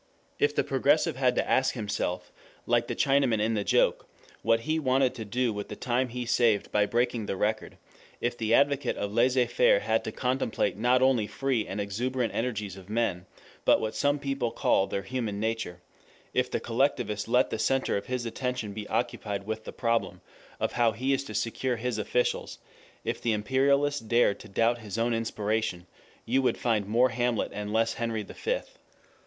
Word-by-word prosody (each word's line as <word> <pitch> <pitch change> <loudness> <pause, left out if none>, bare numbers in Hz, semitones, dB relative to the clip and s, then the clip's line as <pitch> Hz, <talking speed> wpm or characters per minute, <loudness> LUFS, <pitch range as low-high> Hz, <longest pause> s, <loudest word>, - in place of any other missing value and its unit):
If 145 0 +2
the - - +2
progressive 145 +3 +2
had 125 -1 +2
to - - 0
ask 130 0 +2
himself, 100 -5 -3 0.3
like - - +2
the - - -3
Chinaman 135 -5 +2
in 110 +2 +1
the 105 -2 0
joke, - - +2 0.3
what 115 0 +2
he 155 +7 0
wanted 130 -2 +2
to 115 -4 -7
do 120 +2 0
with 105 0 -5
the - - -5
time 125 +1 0
he 125 +1 -4
saved 115 -3 +2
by 105 0 +3
breaking 120 -2 0
the - - -2
record, 110 +3 -2 0.4
if 120 0 -1
the 110 -2 -2
advocate 140 +1 +3
of 100 0 -3
laissez 125 +2 +3
faire - - +3
had - - +1
to - - -3
contemplate 125 -2 -1
not 125 +4 +3
only 125 -5 +3
free 130 -4 -1
and 100 - -4
exuberant 120 +5 -2
energies 105 -5 -2
of 95 0 -13
men, 105 -5 -1 0.4
but - - +5
what 110 0 -2
some 145 +1 +1
people 135 -4 -2
call 95 -3 +2
their 100 - -3
human 110 -2 -3
nature, 110 -5 -3 0.5
if - - +1
the - - -1
collectivist - - 0
let - - +3
the - - -2
center 135 0 +1
of 100 - -3
his 125 -1 -2
attention 125 -2 -3
be 105 0 -6
occupied 100 -1 -2
with 110 +1 -4
the - - -6
problem 115 -1 -1 0.4
of - - 0
how 115 -2 +2
he 130 +6 0
is 135 0 0
to 110 - -7
secure 120 +4 -1
his 120 -1 -2
officials, 125 +4 -1 0.5
if - - -2
the 115 - +1
imperialist 140 +4 +1
dared 115 -3 +3
to 110 - -12
doubt 115 +4 +2
his 105 -1 -6
own 115 +1 +1
inspiration, 110 -4 -1 0.4
you 130 +4 +2
would 130 - +1
find 110 -4 0
more 120 +4 +3
Hamlet 120 -1 0
and 105 0 -4
less 115 +1 +2
Henry 115 -2 -2
the - - -11
Fifth. - - -3
115 Hz, 190 wpm, -28 LUFS, 105-130 Hz, 0.5 s, but